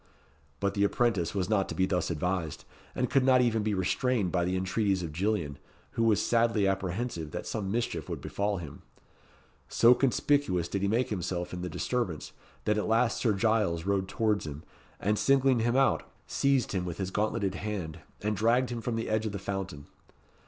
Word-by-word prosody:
But 100 0 0
the 100 - +1
apprentice 100 -5 +1
was 95 -2 0
not 100 -3 +1
to - - -4
be 95 - +2
thus 90 -1 0
advised; 85 0 -2 0.3
and 125 - 0
could 135 +2 +2
not 130 -1 +5
even 115 -3 +2
be 105 -1 0
restrained 100 +2 0
by 90 -2 +1
the 90 +1 0
entreaties 95 0 0
of 80 -3 -5
Gillian, 85 -6 -1 0.3
who - - -2
was 110 -3 +4
sadly 115 -3 +3
apprehensive 95 -2 -2
that - - -5
some 100 -3 -3
mischief 115 +2 -2
would - - -3
befall 100 0 -2
him. 80 -6 -8 0.9
So 120 +1 +6
conspicuous 125 - +1
did 100 - -3
he 100 - +1
make 120 +5 +1
himself 90 -3 -3
in 90 - -4
the 90 - -3
disturbance, 90 -3 -2 0.3
that 105 0 +2
at - - -2
last 115 +2 +2
Sir 115 -4 +2
Giles 100 -5 +1
rode 100 -1 0
towards 105 -4 0
him, 75 +1 -7 0.4
and 105 +2 +1
singling 135 -2 +4
him 120 +2 +1
out, 135 0 +3 0.2
seized 140 -3 +1
him 95 -3 -1
with 90 -2 -5
his 95 -1 -3
gauntleted 105 -1 0
hand, 95 -5 -4 0.2
and 105 0 0
dragged 120 +4 +2
him 120 -1 -3
from 120 0 -2
the 115 - -2
edge 110 0 0
of 105 - -5
the - - -2
fountain. 95 -7 -5
100 Hz, 195 wpm, -29 LUFS, 90-115 Hz, 0.9 s, So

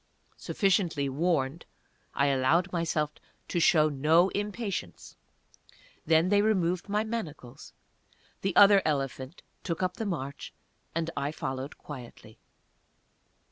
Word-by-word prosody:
Sufficiently 180 -8 0
warned, 150 0 -1 0.5
I 140 - +2
allowed 140 +7 +2
myself 160 -3 0 0.4
to 175 - 0
show 155 -2 +5
no 155 +5 +3
impatience. 205 - -5 0.9
Then 165 +2 +4
they 205 0 +4
removed 185 -3 0
my 210 +1 +1
manacles; 165 - -7 0.7
the 195 -2 -1
other 200 -1 +7
elephant 135 0 -3 0.2
took 170 +1 -3
up 180 +1 -1
the 220 - -3
march, 140 -6 -5 0.4
and 165 0 -1
I 140 +1 -2
followed 135 -2 -5
quietly. 120 -6 -11
165 Hz, 110 wpm, -28 LUFS, 140-190 Hz, 0.9 s, other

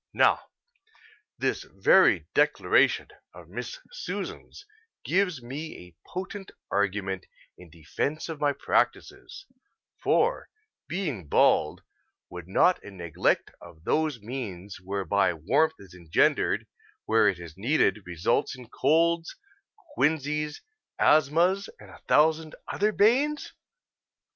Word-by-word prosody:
Now, - - +3 0.9
this - - -1
very - - +4
declaration - - +3 0.3
of - - -13
Miss - - -6
Susan's 405 -3 -7 0.4
gives 180 -8 0
me 145 +6 -7
a 85 - -28
potent 190 +1 -6 0.2
argument 95 -2 -1 0.3
in 90 -1 -15
defence 85 - -4
of 160 -3 -7
my 145 -1 +3
practices, 385 - -2 0.6
for, 480 +3 +1 0.4
being 145 - -3
bald, - - +3 0.5
would 90 -1 -8
not 180 - +3
a - - -9
neglect 85 -5 -1
of 80 - -14
those 155 - 0
means 105 -5 -7
whereby 95 -1 0
warmth 155 - +1
is 95 -3 -15
engendered 85 -3 +1 0.4
where 110 -1 +4
it 95 -3 +1
is 85 -3 -10
needed 110 -1 +1
result 90 +6 -1
in 125 -3 -13
colds, 165 +3 +1 0.6
quinsies, 150 0 0 0.4
asthmas, 165 +6 +3
and - - -14
a - - -15
thousand 155 +1 +3
other 210 +2 0
banes? 265 +9 +2
145 Hz, 110 wpm, -27 LUFS, -, 0.9 s, very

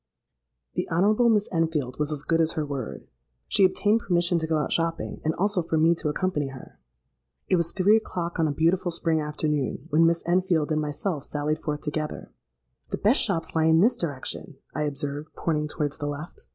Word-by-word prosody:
"The - - -2
Honourable 210 +8 +3
Miss 210 -2 +3
Enfield 160 -7 -1
was 150 0 0
as 150 -1 -3
good 165 +1 +2
as 160 0 +2
her 155 - -1
word. 140 -5 -5 0.4
She 200 - +3
obtained 205 +4 +3
permission 175 -4 +1
to 160 - -2
go 160 -1 +1
out 150 - -1
shopping, 165 0 -1
and 155 +1 0
also 200 0 +1
for 160 -1 -1
me 165 +2 +5
to 160 -2 -2
accompany 150 -3 -1
her. 135 -1 -11 0.7
It 185 - +4
was 170 -1 +1
three 200 +3 +4
o'clock, 175 -6 -4
on 160 - +3
a - - 0
beautiful 175 +5 +1
spring 165 -2 0
afternoon, 150 -2 -2
when 165 +2 +5
Miss 170 0 +1
Enfield 175 -3 +1
and 155 0 +1
myself 150 +1 -3
sallied 150 +1 -2
forth 150 -1 -3
together. 150 0 -4 0.6
'The - - -2
best 225 +8 +3
shops 165 -7 -1
lie 160 -1 +3
in 160 +1 +5
this 235 +5 +4
direction,' 150 +1 -4 0.2
I 150 - -1
observed, 145 +1 -4
pointing 150 -2 -1
towards 150 0 -3
the 145 - -2
left. 145 +3 -7
160 Hz, 195 wpm, -26 LUFS, 150-175 Hz, 0.7 s, me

